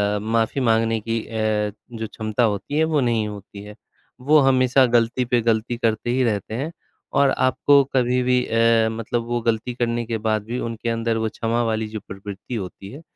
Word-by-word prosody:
अ, - - -1
माफ़ी 115 +5 0
माँगने 115 -1 +2
की 115 +1 -2
अ, 110 -2 -1 0.3
जो 110 - -3
क्षमता 110 +2 -2
होती 110 +6 -1
है 160 - +4
वो 150 - +3
नहीं 115 -3 +1
होती 100 -1 -9
है। 105 0 -11 0.5
वो 150 +4 +5
हमेशा 130 -1 +4
गलती 120 +1 +1
पे 120 0 +1
गलती 115 +1 0
करते 115 0 -1
ही 130 +1 +2
रहते 110 -2 -1
हैं 145 +7 -3 0.4
और 140 -1 +5
आपको 140 +2 +3
कभी 125 0 +2
भी 125 0 +2
अ, 115 0 +3
मतलब 115 +1 -3
वो 120 0 -1
गलती 115 +1 -1
करने 120 -1 -1
के 115 0 -2
बाद 110 -1 0
भी 120 +3 -4
उनके 115 0 -4
अंदर 115 0 0
वो 110 0 -1
क्षमा 115 +2 -1
वाली 110 -1 -1
जो 110 0 -6
प्रवृत्ति 100 +4 -7
होती 95 -1 -7
है, 145 - -10
115 Hz, 195 wpm, -22 LUFS, 110-125 Hz, 0.5 s, वो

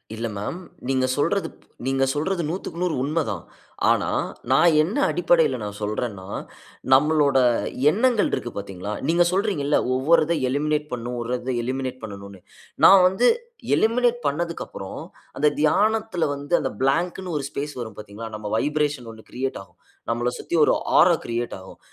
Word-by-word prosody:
இல்ல 115 +1 -3
மேம். 105 - -4 0.3
நீங்க 130 -1 +2
சொல்றது 180 +7 +1
ப் - - -25 0.2
நீங்க 135 0 +1
சொல்றது 170 +5 -1
100க்கு 170 0 -5
100 180 -3 0
உண்மை 155 +4 0
தான். 95 -7 -4 0.5
ஆனா - - +2 0.4
நான் 155 +4 +5
என்ன 195 - -3
அடிப்படையில - - +2
நான் 105 0 -6
சொல்றேன்னா, 105 -2 -3 0.7
நம்மளோட 145 0 +4 0.5
எண்ணங்கள் 230 +1 +2
இருக்கு 120 - -3
பார்த்தீங்களா? 100 0 -6
நீங்க 170 +2 +4
சொல்றீங்கள்ல, 180 -7 +1 0.2
ஒவ்வொரு 150 +6 +4
இத 170 - +1
எலிமினேட் 150 +2 0
பண்ணும், 120 0 -4
ஒர்றத 125 +2 -3
எலிமினேட் 130 +1 -3
பண்ணனும்னு, 100 -2 -9 0.5
நான் 195 -1 +8
வந்து 190 +7 +2 0.5
எலிமினேட் 240 +2 +2
பண்ணதுக்கப்புறம், 170 +4 -4 0.4
அந்த 150 - +3
தியானத்தில 210 +4 +2
வந்து 145 +4 -6
அந்த - - -2
பிளாங்க்னு 175 +5 0
ஒரு 145 - -3
ஸ்பேஸ் 145 +2 -5
வரும். 110 -3 -7
பார்த்தீங்களா? 105 +2 -8
நம்ம 105 -1 -6
வைப்ரேஷன் 145 -2 -1
1 110 0 -15
கிரியேட் 130 +2 -3
ஆகும். - - -26 0.3
நம்மள 120 +1 0
சுத்தி - - -3
ஒரு - - +4 0.2
ஆரா 170 +2 +6
கிரியேட் 120 +1 -3
ஆகும். 95 0 -13
145 Hz, 150 wpm, -23 LUFS, 120-175 Hz, 0.7 s, நான்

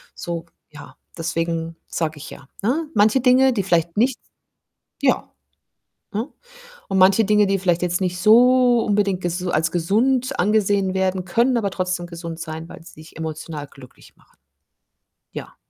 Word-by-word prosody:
so 170 -1 -5 0.3
ja, 145 -1 -13 0.2
deswegen 165 0 -3
sage 160 -2 -3
ich 145 - -9
ja, 135 - -13
ne? 295 +9 0
Manche 220 +4 +3
Dinge, 260 +1 +4
die 200 -4 -1
vielleicht 170 -2 0
nicht 245 +3 +2 0.8
ja, - - +1 0.8
ne? 225 +6 -3 0.6
Und 195 - -1
manche 195 +3 +5
Dinge, 210 -1 +3
die 195 0 +1
vielleicht 175 -2 +1
jetzt 175 0 0
nicht 180 -1 -1
so 245 +3 +5
unbedingt 200 -3 +1
ges 175 +1 -3
als 160 -1 +1
gesund 245 +9 +1
angesehen 200 -1 +2
werden, 190 -1 -1
können 235 +7 +2
aber 200 -3 0
trotzdem 180 -2 -2
gesund 170 -1 -8
sein, 160 0 -7
weil - - -11
sie - - -14
dich 160 - -15
emotional 155 -2 -6
glücklich 130 -2 -17
machen. - - -29 1.0
Ja. - - -9
185 Hz, 155 wpm, -21 LUFS, 165-220 Hz, 1.0 s, manche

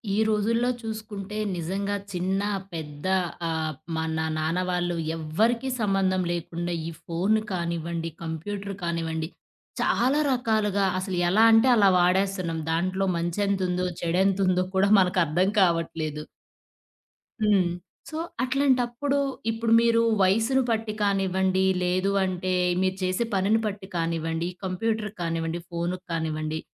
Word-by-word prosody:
ఈ - - -1
రోజుల్లో 225 +3 +1
చూసుకుంటే 215 -2 -6 0.2
నిజంగా 195 +4 -2 0.2
చిన్న, 190 +2 -1 0.3
పెద్ద 150 0 -6 0.4
ఆహ్, 160 -1 -1 0.2
మన 160 0 -2 0.2
నాన్న 160 +3 0
వాళ్ళు 175 -1 0 0.2
ఎవ్వరికీ 220 +12 0
సంబంధం 195 -3 +1
లేకుండా 175 0 -3
ఈ - - -4
ఫోను 195 +6 +1
కానివ్వండి, 170 -1 -3
కంప్యూటరు 195 +5 -5
కానివ్వండి, 165 -1 -2 0.5
చాలా 265 +5 +2
రకాలుగా 215 -5 +1
అసలు 185 -1 -3
ఎలా 210 +5 +4
అంటే 225 +3 +6
అలా 200 -3 +5
వాడేస్తున్నాం. 180 -2 +1
దాంట్లో 185 +4 0
మంచేంతుందో, 180 +1 0 0.2
చెడేంతుందో 185 +1 +2
కూడా 190 +1 +4
మనకర్థం 180 -1 +2
కావట్లేదు. 165 -4 0 1.2
హ్మ్. 200 -4 +3 0.4
సో, 310 - -5 0.3
అట్లాంటప్పుడు 260 0 +1 0.3
ఇప్పుడు 225 0 0
మీరు 230 0 +4 0.2
వయసును 225 +8 +3
పట్టి 225 -1 -1
కానివ్వండి, 190 -1 +1 0.2
లేదు 185 +2 +1
అంటే 185 0 -1 0.3
మీరు 190 0 +1
చేసే 185 +5 0
పనిని 200 +4 +3
పట్టి 200 -2 -4
కానివ్వండి, 165 0 -1 0.2
కంప్యూటరు 210 +3 -1
కానివ్వండి, 165 0 -2
ఫోనుకు 175 +2 -3
కానివ్వండి, 155 -1 -2
185 Hz, 110 wpm, -26 LUFS, 170-210 Hz, 1.2 s, అంటే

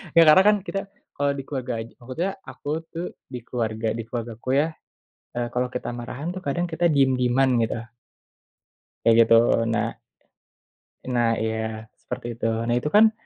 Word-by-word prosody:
Ya 165 - +9
karena 170 +5 +8
kan 210 - +6
kita 195 -1 -4 0.2
kalau 145 0 0
di 135 - -5
keluarga 130 -3 -3
aj 115 - -12
maksudnya, 130 +10 -3 0.2
aku 130 +2 -8 0.2
tuh 170 +2 -4 0.2
di 125 -2 -6
keluarga 115 -2 -2
di 115 +1 -3
keluargaku 115 0 -5
ya, 155 - +1 0.7
eee, 120 0 0
kalo 125 0 0
kita 125 0 -4
marahan 125 +7 -5
tuh 185 - -6
kadang 175 +2 -1
kita 175 0 -1
diem-dieman 130 -2 +3
gitu. 115 0 0 1.3
Kayak 115 - +6
gitu 115 - +4 0.4
nah. 115 0 -1 1.1
Nah 120 -3 +1
iya, 110 0 -2 0.2
seperti - - -6
itu. 115 - +1 0.2
Nah 120 - 0
itu 135 - -2
kan 215 +6 +6
125 Hz, 160 wpm, -24 LUFS, 115-150 Hz, 1.3 s, Ya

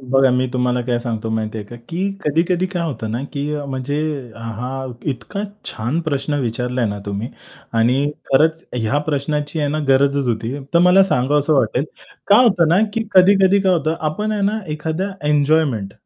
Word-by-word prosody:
बघा, 135 0 +3
मी 125 +1 +1
तुम्हाला 125 -1 0
काय 120 0 0
सांगतो 115 -2 -4
माहिती 110 0 -2
आहे 105 - -6
का, 120 - -10
की 190 +4 -1
कधी-कधी 170 +4 +1
काय 180 -2 -3
होतं 115 -9 -4
ना 120 +4 -2
की 145 +1 -3
अ, 145 -1 -4
म्हणजे 135 +1 -3 0.4
हा 125 +4 -5 0.2
इतका 200 +10 -5 0.2
छान 120 +10 -2
प्रश्न 145 -2 -2
विचारला 125 +1 -1
ना 100 -1 -3
तुम्ही 100 +4 -3 0.5
आणि 130 +5 +2 0.2
खरंच 160 +4 +3
ह्या 120 +4 0
प्रश्नाची 150 +1 -1
आहे 145 - 0
ना 155 +2 -1
गरजच 140 0 +3
होती. 115 +2 -2 0.2
तर - - +7
मला 180 +2 +6
सांगावसं 145 -3 +1
वाटेल, 130 0 +1 0.4
काय 210 +5 +6
होतं 175 -7 +3
ना 170 +3 +4 0.2
की 225 - 0
कधी-कधी 195 +1 +5
काय 190 -1 +3
होतं, 160 -2 +1
आपण 185 +8 -1
आहे 210 - -1
ना 210 +2 +1
एखादा 160 +6 -3 0.2
एन्जॉयमेंट 145 -9 +2
140 Hz, 175 wpm, -19 LUFS, 125-165 Hz, 0.5 s, तर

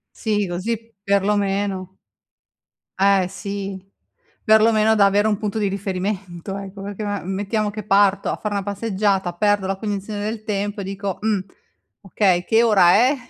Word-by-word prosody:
Sì, 210 -3 0
così, 225 +6 -4
perlomeno 200 -1 0 1.0
Eh, 195 -1 +4
sì, 200 0 -5 0.6
perlomeno 220 0 +4
da 200 - +5
avere 205 +2 +3
un 210 -2 0
punto 215 -1 -3
di 205 -2 +1
riferimento, 195 -1 -4
ecco, 195 0 -8
perché 205 +1 -5
ma 205 -1 -2
mettiamo 205 +3 -2
che 215 0 -7
parto 200 -1 +3
a - - -1
fare 210 -1 -4
una 200 -1 -2
passeggiata, 200 -2 0
perdo 205 0 +1
la 195 - -1
cognizione 205 0 -4
del 215 0 -4
tempo, 205 -1 -3
e 195 - -4
dico: 195 -1 -4
"Mh, 215 -2 +1 0.6
okay. 190 -2 +1
Che 225 +3 +3
ora 195 -6 +5
è?" 255 +7 +4
200 Hz, 155 wpm, -21 LUFS, 195-215 Hz, 1.0 s, da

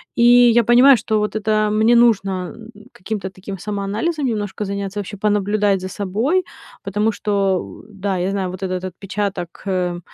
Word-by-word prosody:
И 235 - +2
я 240 -1 +6
понимаю, 245 +4 +7
что 215 0 -1
вот 210 0 -2
это 215 0 +1
мне 220 +3 +3
нужно- 195 -6 +2 0.4
каким-то 195 0 -5
таким 190 +1 -8
самоанализом 210 - -2
немножко 210 -4 -3
заняться, 200 0 -4
вообще 205 +1 -6
понаблюдать 205 -1 +1
за 185 - -5
собой, 225 - -1 0.4
потому 210 +3 0
что, 200 -3 -1
да, 200 -2 -3
я 180 +2 -1
знаю, 190 -2 -2
вот 185 +2 -8
этот 185 -1 -3
отпечаток, 195 -1 -5
э, 180 -2 -1
205 Hz, 155 wpm, -19 LUFS, 190-220 Hz, 0.4 s, понимаю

